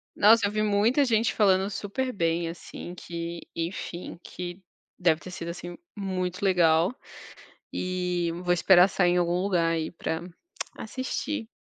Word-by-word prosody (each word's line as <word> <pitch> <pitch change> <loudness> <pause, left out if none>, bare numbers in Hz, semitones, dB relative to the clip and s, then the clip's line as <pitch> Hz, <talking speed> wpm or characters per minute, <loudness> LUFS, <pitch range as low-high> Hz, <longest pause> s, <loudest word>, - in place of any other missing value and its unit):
Nossa 215 0 +6
eu - - -3
vi 215 0 0
muita 215 +7 +3
gente 225 -3 +2
falando 195 -2 +3
super 255 +6 -3
bem 165 -2 0
assim 175 +1 -8
que, 170 -1 -6
enfim, 170 0 -5
que 180 +1 -7 0.4
deve 165 -3 +3
ter 185 - -9
sido 170 -1 -6
assim 175 0 -7 0.2
muito 185 -2 -3
legal. 175 +1 +4 0.8
E 180 -2 -1
vou 175 0 +3
esperar 180 +1 +6
sair 175 -2 +3
em 180 - +2
algum 175 +1 +1
lugar 170 -4 +2
aí 160 -1 -1
pra 160 -1 -3 0.6
assistir. 260 +2 -3
180 Hz, 145 wpm, -27 LUFS, 170-205 Hz, 0.8 s, Nossa